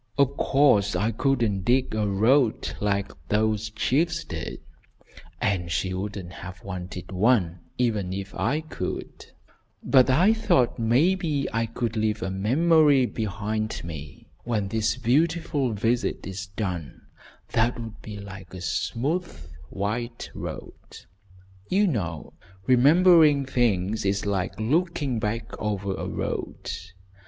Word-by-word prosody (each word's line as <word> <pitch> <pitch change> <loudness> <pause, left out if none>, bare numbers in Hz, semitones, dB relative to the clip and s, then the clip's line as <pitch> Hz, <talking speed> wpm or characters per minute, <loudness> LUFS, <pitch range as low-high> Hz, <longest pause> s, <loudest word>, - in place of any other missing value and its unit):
"Of 140 -1 +3
course 135 -10 +3
I 110 +3 +1
couldn't 115 -5 +1
dig 125 +6 +1
a 105 -1 0
road 110 +5 +2
like 100 -1 0 0.2
those 110 0 +1
chiefs 160 +9 0
did, 80 - -6 0.8
and 90 -4 0
she 80 +6 -1
wouldn't 95 -2 -5
have 90 +1 -9
wanted 90 -1 -7
one, 95 -3 +2 0.2
even 110 -7 0
if 95 +1 -5
I 150 +3 0
could; 155 - -6 0.6
but 130 -2 +5
I 175 +12 +5
thought 130 - +2
maybe 145 +5 +2
I 115 0 0
could 115 0 -3
leave 110 -1 0
a 95 - -2
memory 140 - +4
behind 110 0 -3
me 75 -4 -8 0.2
when 105 -5 -1
this 110 +3 0
beautiful 145 +1 +1
visit 115 +4 0
is 95 0 -6
done, 90 - -5 0.5
that 120 +2 +1
would 115 -2 -8
be 105 -1 -8
like 100 -2 -10
a 90 - -8
smooth, 115 - -2 0.2
white 115 - -4
road. - - -8 0.7
You 200 +3 +3
know 90 - -3 0.3
remembering 150 +2 +6
things 110 -5 +1
is 100 +1 0
like 100 -1 -2
looking 145 0 0
back 110 +1 -3
over 100 -2 -1
a - - -4
road. - - -4
110 Hz, 125 wpm, -25 LUFS, 100-135 Hz, 0.8 s, remembering